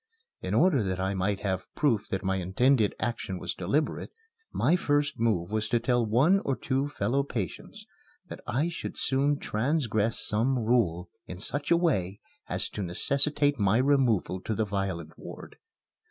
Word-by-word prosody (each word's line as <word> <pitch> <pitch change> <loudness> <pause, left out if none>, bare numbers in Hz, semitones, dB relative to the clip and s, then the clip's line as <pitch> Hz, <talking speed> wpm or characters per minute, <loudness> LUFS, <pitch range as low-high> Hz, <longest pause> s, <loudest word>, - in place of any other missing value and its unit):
In - - -2
order 170 -9 +4
that 95 -2 -2
I 95 +1 -1
might 95 +1 -1
have 95 -3 -2
proof 120 -9 +1
that 95 - -3
my 95 0 0
intended 105 +5 +2
action 110 -5 -3
was - - -4
deliberate, 140 - -1 0.4
my 170 - +2
first 145 -5 0
move 105 -6 0
was 110 0 -1
to 120 - +2
tell 120 0 +1
one 130 - +3
or 135 -8 -1
two 135 +2 -1
fellow 135 0 0
patients 140 - -6 0.4
that - - -9
I 140 +8 0
should 170 - -6
soon 140 +2 +1
transgress 115 -4 0
some 120 +5 +2
rule 95 -8 +1 0.2
in 90 - -7
such 145 +8 -1
a 170 - +5
way 100 - 0 0.3
as - - -1
to 105 - -6
necessitate 140 - +1
my 100 +2 +3
removal 125 -9 +2
to 110 - -3
the 110 - 0
violent 95 -5 -4
ward. - - -10
115 Hz, 165 wpm, -28 LUFS, 95-140 Hz, 0.4 s, a